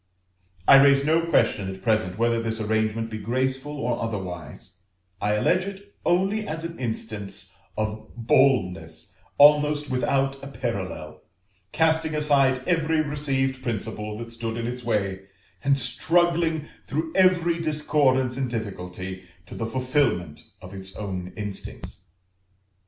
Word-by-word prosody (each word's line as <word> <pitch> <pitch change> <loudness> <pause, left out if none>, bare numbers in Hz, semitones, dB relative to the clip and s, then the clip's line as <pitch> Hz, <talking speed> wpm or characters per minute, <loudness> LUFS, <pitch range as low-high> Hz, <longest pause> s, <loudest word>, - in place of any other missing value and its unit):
I 135 - +10
raise 140 0 +5
no 165 +2 +2
question 100 -11 +2
at 95 0 -10
present 110 -5 +1
whether 115 0 +2
this 110 -1 -2
arrangement 110 +1 0
be 110 - -4
graceful 130 +6 -2
or 125 -4 -1
otherwise; 95 -4 -6 0.4
I 105 +1 +1
allege 180 +13 +2
it 200 +1 -9
only 195 +4 +1
as 160 +1 -4
an 170 0 -6
instance 110 -4 -4 0.2
of 110 0 -3
boldness 115 -9 +1 0.2
almost 150 0 +5
without 135 +1 0
a - - -6
parallel, 95 - -5 0.5
casting 160 -1 +2
aside 135 -4 +3
every 160 -2 +2
received 135 -3 -1
principle 110 -3 -4
that 115 0 -7
stood 115 -1 -4
in 115 - -3
its 125 +1 -4
way, 100 -4 -1 0.4
and 140 0 +3
struggling 160 +5 +1 0.2
through 160 +3 -2
every 175 -3 +3
discordance 145 -5 +2
and 130 -2 -1
difficulty 95 -4 -5 0.2
to - - -11
the 115 - -3
fulfilment 125 - 0 0.2
of 90 +1 -10
its 95 0 -8
own 95 -3 -5
instincts. 105 -2 -7
125 Hz, 130 wpm, -25 LUFS, 105-150 Hz, 0.5 s, I